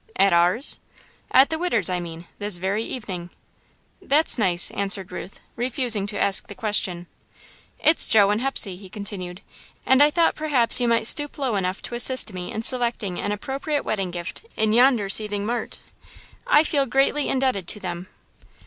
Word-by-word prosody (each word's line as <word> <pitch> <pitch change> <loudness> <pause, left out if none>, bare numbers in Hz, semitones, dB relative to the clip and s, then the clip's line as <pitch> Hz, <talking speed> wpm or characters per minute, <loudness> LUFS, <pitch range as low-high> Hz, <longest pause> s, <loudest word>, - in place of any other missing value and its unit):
"At 195 -2 +3
ours?" 180 +10 +2 0.5
"At 270 +3 +4
the 320 - -2
'Widder's,' 235 - +1
I 180 -1 -1
mean, 170 0 -8
this 205 -3 -1
very 195 +5 -2
evening." 190 -9 -6 0.7
"That's 310 -6 +3
nice," 180 -4 +2
answered 195 -2 -3
Ruth, 190 - -9
refusing 240 -4 +1
to 205 0 -4
ask 195 -1 +1
the 205 - -10
question. 190 -5 -1 0.7
"It's 315 +1 +3
Joe 205 -2 +5
and 210 +2 -1
Hepsey," 230 -8 -2
he 190 0 -13
continued, 190 -2 -6 0.4
"and 265 +1 +4
I 295 - +7
thought 335 +2 +2
perhaps 270 -6 +3
you 240 - +1
might 230 -1 +1
stoop 290 +5 +4
low 265 -6 -2
enough 185 0 -3
to - - -7
assist 240 -2 +2
me 180 -1 -6
in 220 - -5
selecting 235 -7 -1
an 205 - -3
appropriate 275 +7 -3
wedding 195 -4 -2
gift 175 - -7
in 215 0 +1
yonder 240 -3 +3
seething 205 0 -1
mart. 235 +1 -4 0.7
I 295 - +5
feel 285 -3 0
greatly 275 +3 +1
indebted 255 -9 -1
to 210 - -5
them." 180 -1 -6
215 Hz, 170 wpm, -23 LUFS, 190-260 Hz, 0.7 s, I